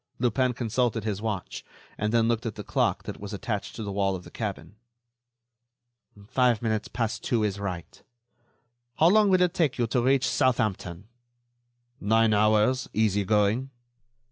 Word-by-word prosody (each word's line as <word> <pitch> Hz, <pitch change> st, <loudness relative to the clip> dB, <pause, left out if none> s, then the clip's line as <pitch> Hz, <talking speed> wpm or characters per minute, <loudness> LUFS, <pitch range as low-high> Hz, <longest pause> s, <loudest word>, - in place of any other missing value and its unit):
Lupin 125 Hz, +1 st, +1 dB
consulted 120 Hz, -1 st, -1 dB
his 105 Hz, -2 st, -3 dB
watch, 105 Hz, -4 st, -4 dB, 0.4 s
then 115 Hz, +2 st, +2 dB
looked 115 Hz, 0 st, 0 dB
at 110 Hz, -, -5 dB
the -, -, -7 dB
clock -, -, 0 dB
that -, -, -7 dB
was 100 Hz, +1 st, -7 dB
attached 100 Hz, +1 st, -4 dB
to 110 Hz, -, -5 dB
the 100 Hz, -, -4 dB
wall 95 Hz, -1 st, 0 dB
of 90 Hz, -, -8 dB
the -, -, -13 dB
cabin. 105 Hz, -1 st, -5 dB, 1.5 s
"Five 120 Hz, -2 st, +2 dB
minutes 110 Hz, -2 st, -1 dB
past 115 Hz, -3 st, -3 dB
two 115 Hz, -3 st, +1 dB
is 100 Hz, -1 st, -1 dB
right. 90 Hz, -4 st, -6 dB, 0.9 s
How 165 Hz, -, +5 dB
long 210 Hz, +1 st, +5 dB
will 185 Hz, -1 st, +4 dB
it 180 Hz, -1 st, +1 dB
take 155 Hz, -8 st, +1 dB
you 120 Hz, -, +1 dB
to 120 Hz, +2 st, 0 dB
reach 130 Hz, +1 st, +2 dB
Southampton?" 105 Hz, -8 st, 0 dB, 0.9 s
"Nine 110 Hz, +1 st, +3 dB
hours, 110 Hz, +5 st, +2 dB
easy 105 Hz, -2 st, +2 dB
going." 105 Hz, +5 st, +1 dB
110 Hz, 155 wpm, -26 LUFS, 105-125 Hz, 1.5 s, How